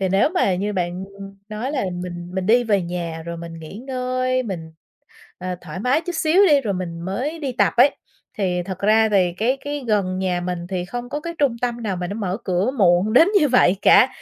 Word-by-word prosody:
Thì 190 - +1
nếu 195 +8 +3
mà 360 - +1
như 205 +3 -2
bạn 180 0 -2 0.4
nói 225 +7 -4
là 260 -8 -1 0.2
mình 175 -1 -7
mình 190 -1 -2
đi 240 +3 +4
về 205 -5 +2
nhà 170 -2 -4
rồi 170 0 -5
mình 165 0 -8
nghỉ 160 +4 -10
ngơi, 255 0 -1
mình, 165 -7 -6 0.7
ờ, 180 0 -4
thoải 185 - -7
mái 255 +8 +2
chút 350 +1 -5
xíu 330 +5 +4
đi, 290 -3 +5
rồi 205 -5 -2
mình 170 -2 -5
mới 250 - -3
đi 280 -4 -3
tập 245 - +2
ấy, 275 +4 +6 0.4
thì 180 -3 0
thật 190 +1 -6
ra 220 +2 +4
thì 185 -4 +2
cái 250 +5 +1
cái 290 -1 -4
gần 190 -3 0
nhà 180 -2 -1
mình 175 -1 -4
thì 180 -2 -3
không 245 +5 -6
có 295 - -3
cái 335 +2 -6
trung 265 -5 +1
tâm 240 -1 -2
nào 195 -3 -1
mà 180 0 -4
nó 200 - -5
mở 195 -3 -2
cửa 190 +6 0
muộn 185 +1 +3
đến 320 +8 +7
như 300 - +3
vậy 220 -7 +4
cả. 255 - +7
200 Hz, 230 wpm, -21 LUFS, 180-255 Hz, 0.7 s, đến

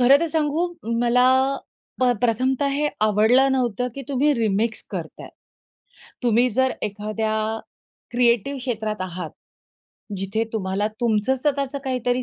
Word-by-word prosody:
खरं 265 +3 +7
तर 335 - +1
सांगू 315 +2 +1 0.3
मला 245 +1 +4 0.8
अ, 250 -1 +5
प्रथमतः 255 +4 +1
हे 295 +2 +1 0.2
आवडलं 220 +6 +4
नव्हतं, 250 -2 0
की 275 - -6
तुम्ही 280 +2 +2
रिमिक्स 225 -1 0
करताय. - - -6 0.9
तुम्ही 240 +1 +3
जर 260 +3 +2
एखाद्या 215 +1 -2 0.8
क्रिएटिव्ह 240 +2 +2
क्षेत्रात 220 -5 -3
आहात. 180 -3 -5 0.9
जिथे 195 +4 -1
तुम्हाला 200 -1 -1
तुमचं 230 +2 +2
स्वतःच 280 0 -1
काहीतरी 250 -1 0
245 Hz, 120 wpm, -23 LUFS, 215-265 Hz, 0.9 s, खरं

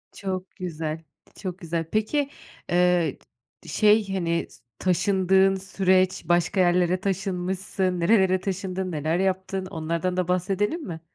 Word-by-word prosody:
Çok 185 -1 -5
güzel, 160 -3 -4 0.3
çok 185 -2 -6
güzel. 165 -1 -3
Peki, 275 +7 0 0.4
eee, 175 -1 +2 0.5
şey, 210 -2 +3
hani, 170 -3 0
s - - -18 0.2
taşındığın 190 +1 +3
süreç, 185 -1 +1
başka 175 +3 +2
yerlere 180 0 +3
taşınmışsın. 190 -1 -1
Nerelere 185 0 +4
taşındın, 190 -1 -3
neler 155 +2 0
yaptın 190 0 -1
onlardan 170 +2 -2
da 180 - 0
bahsedelim 195 - 0
mi? 165 -2 -6
185 Hz, 120 wpm, -25 LUFS, 175-195 Hz, 0.5 s, Nerelere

